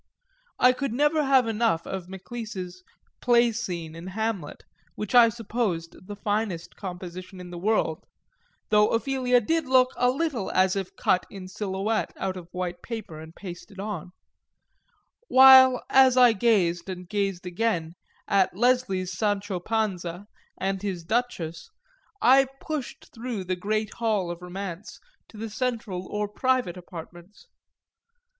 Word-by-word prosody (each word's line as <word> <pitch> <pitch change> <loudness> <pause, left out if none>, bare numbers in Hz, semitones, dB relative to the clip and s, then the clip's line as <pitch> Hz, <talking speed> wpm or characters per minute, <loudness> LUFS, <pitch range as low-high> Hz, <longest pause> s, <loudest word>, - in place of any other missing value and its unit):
I 250 - +6
could 255 -1 -3
never 295 +4 +2
have 270 -3 +4
enough 220 -6 +1
of 185 -2 -6
Maclise's 190 -2 -7 0.4
Play 240 -1 +4
scene 175 -8 -4
in 165 +2 -9
Hamlet, 200 -5 -3 0.3
which 210 +2 -5
I 240 -2 +8
supposed 215 -7 -3
the 205 - -6
finest 205 -5 -2
composition 185 0 -8
in 180 -1 -9
the 175 - -7
world 190 -5 0 0.7
(though 210 0 +5
Ophelia 250 0 +2
did 320 +6 0
look 255 -1 +5
a 245 - +3
little 270 -6 -1
as 185 0 +3
if 195 -2 -4
cut 180 - +1
in 190 -2 -9
silhouette 195 +3 -2
out 190 -1 -2
of 175 -2 -9
white 180 -1 -4
paper 215 -9 -7
and 160 +1 -11
pasted 190 +1 -10
on;) 200 -4 -5 1.2
while 260 - +8
as 260 -1 +5
I 245 -2 +7
gazed, 190 -5 +1
and 180 -1 -6
gazed 195 -2 -2
again, 175 -3 -1 0.3
at 190 -2 +2
Leslie's 205 -7 +1
Sancho 205 -2 -1
Panza 190 -3 -2 0.3
and 195 0 -1
his 190 -4 -4
Duchess 170 -6 -2 0.5
I 265 +2 +6
pushed 305 -5 -6
through 230 -4 -4
the 185 0 -2
great 215 +3 -2
hall 210 -6 0
of 175 0 -8
romance 185 +1 -7 0.3
to 220 - -15
the 220 0 -5
central 215 -6 -3
or 210 0 -2
private 250 -3 0
apartments. 175 - -11
205 Hz, 140 wpm, -26 LUFS, 180-235 Hz, 1.2 s, I